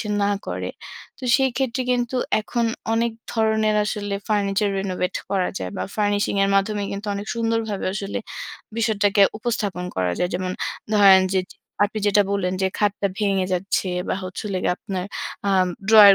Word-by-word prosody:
সে 210 - -4
না 200 - +2 0.2
করে। - - -3 0.5
তো - - -19
সেই 265 -1 +2
ক্ষেত্রে 260 -1 0
কিন্তু 245 +1 0 0.2
এখন 235 +2 -1 0.3
অনেক 230 0 +1 0.2
ধরনের 220 -1 +2
আসলে 205 -2 -2
ফার্নিচার 205 0 +1
renovate 185 -2 -2
করা 190 -2 +1
যায় - - -4
বা - - -2
ফার্নিশিং 205 -1 +1
এর 195 - +1
মাধ্যমে 205 +1 +1
কিন্তু 200 +2 -5
অনেক 200 +1 -5
সুন্দরভাবে 225 -3 -1
আসলে 200 +1 -3 0.6
বিষয়টাকে 205 -3 +3 0.2
উপস্থাপন 205 -6 -2
করা 90 -1 +1
যায়। 180 - 0
যেমন 185 0 -1 0.4
ধরেন, 195 -2 +8
যে 190 - +3
যে - - -15 0.3
আপনি 215 +1 -3
যেটা 205 0 +5
বললেন 185 -2 0
যে - - +4
খাটটা 205 -1 +1
ভেঙে 195 -3 +1
যাচ্ছে 185 +1 0 0.2
বা - - +1
হচ্ছিলো 185 +2 -4
গিয়ে 180 - +2
আপনার 190 -4 -4 0.4
আম 190 -2 +4 0.2
ড্রয়ার 210 -3 +10
205 Hz, 165 wpm, -23 LUFS, 195-220 Hz, 0.6 s, ড্রয়ার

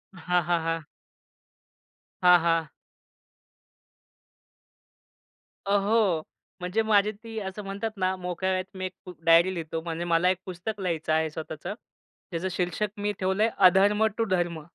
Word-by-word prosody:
हां, 180 0 +1
हां, 170 +1 +1
हां. 165 0 -1 1.4
हां, 180 0 +8
हां. 165 -2 +1 3.0
अहो, 200 -4 +2 0.4
म्हणजे 180 +5 0
माझी 210 -1 +3
ती 220 +1 -8
असं 195 +1 -6
म्हणतात 200 +3 -4
ना, 185 0 +1
मोकळ्या 180 +1 -2
वेळेत 185 +1 -4
मी 185 - -3
एक 185 +1 -9 0.2
डायरी 170 +3 +6
लिहितो. 165 -2 -4
म्हणजे 165 +1 -4
मला 170 +1 +3
एक 185 - +1
पुस्तक 190 +3 -5
लिहायचं 165 -4 -1
आहे 160 0 +2
स्वतःचं. 155 +2 -6 0.6
त्याचं 175 +2 -2
शीर्षक 180 +3 -1
मी 205 0 -1
ठेवलंय, 190 +4 +2
अधर्म 200 +3 +5
टू 230 - +1
धर्म. 175 -3 0
185 Hz, 130 wpm, -27 LUFS, 170-200 Hz, 3.0 s, हां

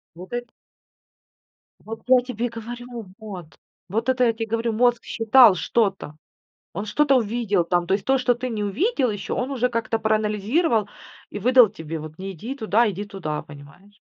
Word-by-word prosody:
Вот 180 +5 -11
это 240 0 -3 1.3
Вот 225 +1 -8
я 255 0 +6
тебе 245 -1 -3
говорю, 235 0 -8
вот. 200 -6 -8 0.4
Вот 225 +6 -2
это 255 -1 +3
я 230 - +3
тебе 225 0 -4
говорю, 230 +1 -1
мозг 240 +1 +2
считал 225 -1 +6
что-то, 195 -5 -1 0.6
он 200 +5 -5
что-то 275 +5 +3
увидел 220 -5 0
там, 175 0 0
то - - -1
есть 195 -1 -3
то, 270 - +4
что 255 -1 +2
ты 250 +2 -4
не 215 -3 -3
увидел 260 - 0
еще, 205 -1 -4
он 250 +2 -2
уже 250 -2 0
как-то 230 -1 -1
проанализировал 215 - +1 0.4
и - - -5
выдал 250 +2 +6
тебе 160 -5 -7
вот: 155 0 -10
"Не 190 +1 -5
иди 225 - -6
туда, 225 -2 +2
иди 200 +2 -5
туда", 185 -7 -5
понимаешь. 155 +8 -15
225 Hz, 175 wpm, -23 LUFS, 195-245 Hz, 1.3 s, я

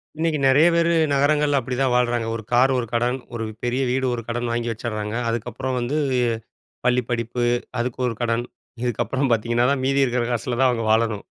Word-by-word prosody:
இன்னைக்கு 160 0 0
நெறைய 140 +5 +6
பேரு, 170 0 +3 0.2
நகரங்கள்ல 145 +1 +3
அப்படி 125 0 -4
தான் 135 -2 +2
வாழுறாங்க. 120 -2 +1
ஒரு 115 - -6
கார் 125 +2 +4
ஒரு 125 - -1
கடன். 120 +2 +1 0.2
ஒரு 115 -1 -3 0.2
பெரிய 125 +2 0
வீடு 130 +1 0
ஒரு 120 - -3
கடன் 120 0 -2
வாங்கி 120 0 -1
வச்சிருறாங்க. 110 -1 -4
அதுக்கப்புறம் 130 +3 -3
வந்து, 125 +5 -1 0.9
பள்ளி 125 0 +3
படிப்பு. 120 +1 -1 0.4
அதுக்கு 120 +1 -3
ஒரு 115 - -3
கடன். 120 0 0 0.4
இதுக்கப்புறம் 125 +3 -1
பார்த்தீங்கன்னா 120 +2 +1
தான், 135 -2 -1
மீதி 135 +1 +3
இருக்குற 125 -1 0
காசுல 120 +1 -2
தான் 130 -1 +5
அவுங்க 115 -2 -1
வாழணும். 110 -2 +1
120 Hz, 180 wpm, -22 LUFS, 115-130 Hz, 0.9 s, நெறைய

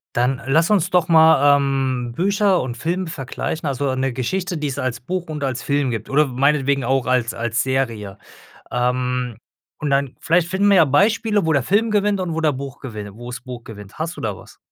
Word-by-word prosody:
Dann 125 +2 +1
lass 165 +6 +3
uns 200 -6 +2
doch 180 -3 +2
mal, 160 -4 +6
ähm, 135 -3 -1
Bücher 195 - +2
und 120 -2 -4
Film 175 +8 -2
vergleichen, 155 +1 -4
also 135 -1 -1
'ne 130 0 -1
Geschichte, 175 +9 -2
die 150 - -2
es 135 - -4
als 125 -2 -2
Buch 175 +6 -4
und 150 -2 -5
als 130 -3 -2
Film 140 -2 0
gibt 110 -1 -5
oder 145 +1 +3
w 125 - -9
meinetwegen 140 -1 +2
auch 130 0 +1
als 125 -3 +1
als 115 0 -1
Serie. 115 -7 -2 0.5
Ähm, 125 -1 -1 0.4
und 150 -2 -2
dann 140 -1 +1
vielleicht 170 +1 +2
finden 195 +3 +1
wir 200 - +5
ja 165 - +7
Beispiele, 205 - +2
wo 160 - +2
der 140 - +2
Film 215 - +1
gewinnt 205 -1 +1
und 170 -3 -2
wo 165 - -1
der 155 -2 +3
Buch 135 +1 -7
gewinn 105 -6 -7
wo 120 +2 -9
das 120 - -6
Buch 125 -2 -9
gewinnt. 105 -2 -11
Hast 165 +2 -3
du - - -6
da 105 -3 -3
was? - - -15
140 Hz, 215 wpm, -21 LUFS, 125-165 Hz, 0.5 s, ja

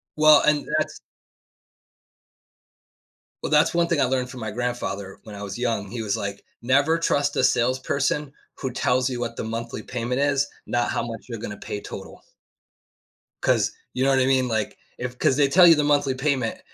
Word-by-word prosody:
Well, 155 -1 +7
and 150 -1 +2
that's - - -2 2.4
Well, - - -2
that's - - +4
one 170 0 +2
thing 170 - +1
I 135 - +4
learned 125 0 -1
from 125 - -9
my 110 -2 -4
grandfather 105 -5 -4
when 105 -2 -10
I 100 - -7
was 100 0 -6
young, 115 -5 -2
he 120 -1 -4
was, 105 -2 -1
like, 100 0 -5 0.2
"Never 140 +6 +3
trust 145 -3 0
a - - +1
salesperson 130 +4 +1 0.3
who 130 - -3
tells 125 +1 +1
you 125 - -4
what 120 -1 -3
the - - -4
monthly 115 +1 -5
payment 125 +2 -2
is, 140 0 +2 0.2
not 120 0 0
how - - -1
much 115 -2 -7
you're 115 -3 -6
going 105 - -6
to 105 - -7
pay 100 - -6
total." - - -9 1.2
'Cause, - - +2 0.2
you 130 - 0
know, 135 - +3
what 135 - +3
I 130 - +3
mean? 130 -1 +2
Like, 110 -3 -2 0.2
if 125 0 -5
'cause 130 - +2
they 145 0 +4
tell 175 +5 +7
you 165 - +8
the 150 - +1
monthly 145 -2 +2
payment, 130 -3 -1
125 Hz, 195 wpm, -24 LUFS, 115-140 Hz, 2.4 s, you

